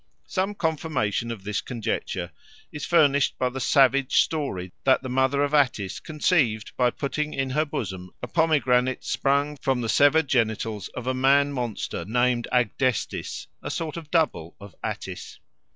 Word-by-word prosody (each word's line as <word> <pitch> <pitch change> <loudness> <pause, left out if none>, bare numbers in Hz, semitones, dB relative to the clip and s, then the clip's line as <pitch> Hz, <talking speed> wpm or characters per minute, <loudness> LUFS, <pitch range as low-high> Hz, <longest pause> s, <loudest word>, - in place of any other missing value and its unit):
Some 195 +2 -2
confirmation 150 - -1
of 115 -5 -6
this 105 0 -2
conjecture 120 -4 -3 0.4
is 150 - -5
furnished 145 -5 +3
by 125 - +1
the 130 +1 -6
savage 135 +1 +4
story 95 - -4
that 135 0 +3
the 130 - -5
mother 130 +2 +2
of 145 +1 -1
Attis 125 -10 +1
conceived 150 - 0
by 125 -1 +3
putting 150 +4 -3
in 135 -1 -1
her 150 +4 +1
bosom 95 -10 -5
a - - -4
pomegranate 130 -6 +2
sprung 140 +1 0
from 130 -2 0
the 115 - -3
severed 145 +4 +4
genitals 110 -5 0
of 125 - -5
a 130 - 0
man 140 +2 +3
monster 120 -9 -3
named 120 +4 +1
Agdestis, 125 0 -1 0.2
a - - -5
sort 160 -2 -3
of 165 -3 -8
double 150 - 0
of 100 -3 -12
Attis. - - -6
130 Hz, 155 wpm, -25 LUFS, 115-145 Hz, 0.4 s, savage